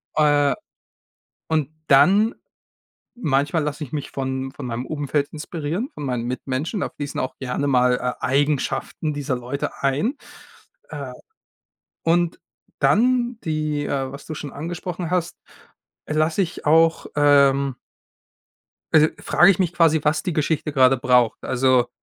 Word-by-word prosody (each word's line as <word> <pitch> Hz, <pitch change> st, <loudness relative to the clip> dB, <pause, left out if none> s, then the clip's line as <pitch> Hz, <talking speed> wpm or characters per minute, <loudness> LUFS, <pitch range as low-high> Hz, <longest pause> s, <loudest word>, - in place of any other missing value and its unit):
Äh, 145 Hz, -2 st, +3 dB, 0.9 s
und 155 Hz, -4 st, 0 dB, 0.2 s
dann 195 Hz, -, +5 dB, 0.8 s
manchmal 150 Hz, -, +1 dB
lasse 150 Hz, +1 st, -4 dB
ich 130 Hz, -, -13 dB
mich 145 Hz, -2 st, -4 dB
von 130 Hz, 0 st, -3 dB
von 140 Hz, -1 st, -7 dB
meinem 120 Hz, +1 st, -4 dB
Umfeld 145 Hz, -1 st, -1 dB
inspirieren, 160 Hz, -, -4 dB
von 150 Hz, -, -6 dB
meinen 125 Hz, -3 st, -2 dB
Mitmenschen. 135 Hz, -, -3 dB
Da -, -, -1 dB
fließen 145 Hz, -1 st, -5 dB
auch 130 Hz, -, -4 dB
gerne 130 Hz, +2 st, -2 dB
mal, 125 Hz, -1 st, +3 dB
äh, 125 Hz, 0 st, -2 dB
Eigenschaften 145 Hz, +2 st, 0 dB
dieser 145 Hz, -2 st, -2 dB
Leute 125 Hz, +3 st, -5 dB
ein. 145 Hz, -, +1 dB, 0.8 s
Äh, 140 Hz, -4 st, -6 dB, 0.9 s
und 170 Hz, +1 st, +1 dB, 0.4 s
dann 245 Hz, +1 st, +2 dB
die, 155 Hz, -2 st, -1 dB
äh 135 Hz, -1 st, -2 dB
was 140 Hz, +1 st, -10 dB
du 160 Hz, -, -5 dB
schon 145 Hz, -2 st, -7 dB
angesprochen 175 Hz, +2 st, -5 dB
hast, 175 Hz, -2 st, -1 dB, 0.7 s
lasse 155 Hz, +4 st, +1 dB
ich 175 Hz, -3 st, -4 dB
auch, 165 Hz, +2 st, +4 dB
ähm 140 Hz, -2 st, +4 dB, 1.2 s
also, 155 Hz, 0 st, +6 dB
frage 175 Hz, -, +4 dB
ich 190 Hz, -, +4 dB
mich 180 Hz, -2 st, 0 dB
quasi, 160 Hz, -2 st, +4 dB
was 150 Hz, +1 st, +2 dB
die 180 Hz, -, -3 dB
Geschichte 155 Hz, 0 st, -1 dB
grade 135 Hz, -1 st, +5 dB
braucht. 125 Hz, -2 st, +2 dB
Also 130 Hz, -1 st, +2 dB
145 Hz, 135 wpm, -22 LUFS, 135-165 Hz, 1.2 s, also